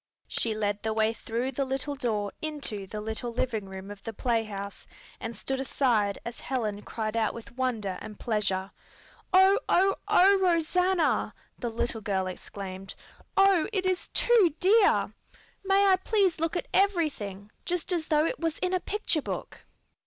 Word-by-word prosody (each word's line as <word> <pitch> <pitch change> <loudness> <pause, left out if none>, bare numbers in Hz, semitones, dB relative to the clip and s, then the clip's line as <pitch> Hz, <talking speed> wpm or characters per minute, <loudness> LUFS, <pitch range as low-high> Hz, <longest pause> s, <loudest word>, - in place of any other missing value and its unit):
She 225 -2 0
led 205 -1 -1
the 220 0 -1
way 220 0 +2
through 235 +3 -3
the 275 +2 -1
little 270 +2 -2
door 215 -7 -1
into 275 -11 -3
the 210 +3 -5
little 220 +3 -4
living 225 -4 -2
room 190 +1 -8
of 205 -1 -10
the 225 - -6
playhouse 215 -4 -2 0.3
and 230 +1 -5
stood 270 0 -3
aside 235 -7 +1
as 235 0 -6
Helen 215 -6 -2
cried 215 0 -4
out 225 -2 +1
with 235 +1 -10
wonder 230 -7 -1
and 210 -1 -9
pleasure. 195 -4 -1 0.6
"Oh, 380 +2 +6
oh, 390 +2 +4
oh, 390 +2 +6
Rosanna!" 360 -1 +2 0.2
the 240 - -2
little 225 0 -2
girl 195 -2 0
exclaimed. 190 +1 -7 0.4
"Oh, 390 -4 +5
it 380 -3 -1
is 370 -1 0
too 415 -11 +3
dear! 410 +2 +4 0.5
May 390 +1 +4
I 380 -1 +5
please 380 -3 +1
look 330 +1 -1
at - - -4
everything, 290 - 0
just 355 +1 -1
as 330 -3 -1
though 305 -1 +3
it - - -2
was 330 -1 -1
in 365 0 -1
a 370 - +2
picture 375 -5 -1
book?" - - -5
250 Hz, 165 wpm, -28 LUFS, 210-355 Hz, 0.6 s, Oh